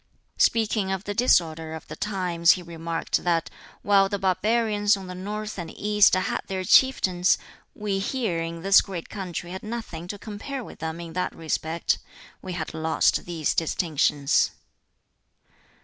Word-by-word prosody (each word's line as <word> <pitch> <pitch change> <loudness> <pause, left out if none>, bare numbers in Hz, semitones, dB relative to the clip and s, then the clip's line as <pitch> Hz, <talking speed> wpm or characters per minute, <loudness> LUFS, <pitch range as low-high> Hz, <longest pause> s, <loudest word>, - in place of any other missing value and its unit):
Speaking 215 -3 +2
of 190 0 -2
the 205 - -3
disorder 165 -8 +2
of 160 - -10
the - - -7
times 180 -4 +2
he 180 - -6
remarked 165 -1 -3
that 170 -2 0 0.3
while 195 -1 +4
the 200 - -1
barbarians 205 +2 +2
on 195 - -8
the 180 - -7
North 210 +3 -5
and 170 -2 -5
East 210 -1 +4
had 185 - -1
their 190 -1 -3
Chieftains, 185 -5 +4 0.4
we 205 -2 -2
here 200 -5 -1
in 165 0 -5
this 195 +1 +7
great 185 -4 -7
country 180 -3 -5
had 190 - -6
nothing 215 -7 -6
to 205 - -5
compare 225 +6 -6
with - - -12
them 160 +1 -4
in 165 -1 -8
that 180 +1 -2
respect: 160 +1 -1 0.4
we 185 - -6
had 165 -2 -4
lost 160 0 +1
these 165 -4 -1
distinctions! 150 -4 +1
185 Hz, 155 wpm, -25 LUFS, 165-205 Hz, 0.4 s, this